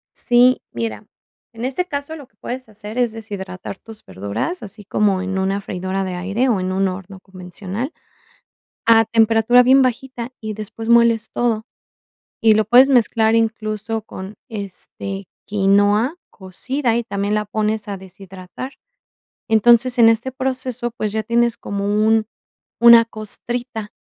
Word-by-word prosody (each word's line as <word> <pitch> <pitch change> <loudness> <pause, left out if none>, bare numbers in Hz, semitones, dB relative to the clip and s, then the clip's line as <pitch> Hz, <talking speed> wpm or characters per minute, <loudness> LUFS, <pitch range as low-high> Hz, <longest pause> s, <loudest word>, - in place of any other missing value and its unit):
Sí, 245 +1 +4
mira, 110 -3 -4 0.5
en 230 +1 -6
este 275 +8 -1
caso, 285 +1 -5
lo 285 -5 -12
que - - -41
puedes 255 -1 -6
hacer 215 +2 -8
es 240 -3 +1
deshidratar 195 -4 -7
tus 220 -1 -14
verduras, 100 - -4
así 210 0 -9
como 195 -1 +1
en 190 0 -3
una 195 +1 0
freidora 190 +1 -3
de 185 -1 -4
aire 200 +8 0
o 205 -5 +1
en 185 - -2
un 190 +1 +1
horno 190 +1 -7
convencional, 190 - -6 0.9
a 225 -1 +6
temperatura 225 +2 +4
bien 265 +2 +5
bajita, 255 0 -3
y 215 -1 -4
después 215 +2 -6
moles 235 -2 +4
todo. 225 -2 0 0.8
Y 225 -1 +6
lo 215 0 +2
puedes 250 +5 +6
mezclar 225 -3 +3
incluso 225 -1 -1
con, 195 -1 -9 0.2
este, 195 -1 -7 0.2
quinoa 205 - +2
cocida, 230 +6 -2
y 235 - 0
también 200 0 -2
la 210 0 -1
pones 215 0 -2
a 200 - -3
deshidratar. 190 +6 -10 0.7
Entonces, 240 +2 +4
en 225 - +8
este 225 +3 0
proceso, 255 -2 -3
pues 215 -4 -2
ya 220 0 -2
tienes 235 +1 +1
como 200 0 -4
un 215 +2 +2 0.6
una 235 -1 +9
costrita, 225 +1 -6
220 Hz, 145 wpm, -20 LUFS, 195-240 Hz, 0.9 s, una